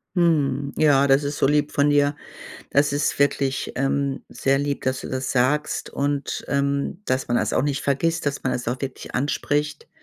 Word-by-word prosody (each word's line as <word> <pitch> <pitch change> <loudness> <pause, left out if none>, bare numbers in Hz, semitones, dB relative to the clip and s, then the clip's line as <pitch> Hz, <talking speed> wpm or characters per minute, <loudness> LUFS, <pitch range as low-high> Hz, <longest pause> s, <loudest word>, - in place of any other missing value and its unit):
Mhm. 145 -5 +1
Ja, 140 -3 +4
das 135 +1 +4
ist 145 +1 -3
so - - +3
lieb 150 +1 +1
von 145 +1 +2
dir. 145 0 +3 0.6
Das 145 +1 +3
ist 145 +1 0
wirklich, 140 -1 0
ähm, 135 +1 -1
sehr 135 0 +1
lieb, 145 0 -2
dass 130 0 -1
du - - -7
das 130 0 -3
sagst 140 +4 0
und, 140 0 -2
ähm, 140 +6 -1
dass 130 +1 0
man 120 - 0
das 110 -3 0
auch - - +2
nicht 140 -1 -1
vergisst, 165 +4 0
dass 145 -1 -2
man 130 - +1
es 125 -1 -3
auch 125 +2 -3
wirklich 135 -2 -6
anspricht, 145 +2 -1
140 Hz, 190 wpm, -23 LUFS, 135-145 Hz, 0.6 s, Ja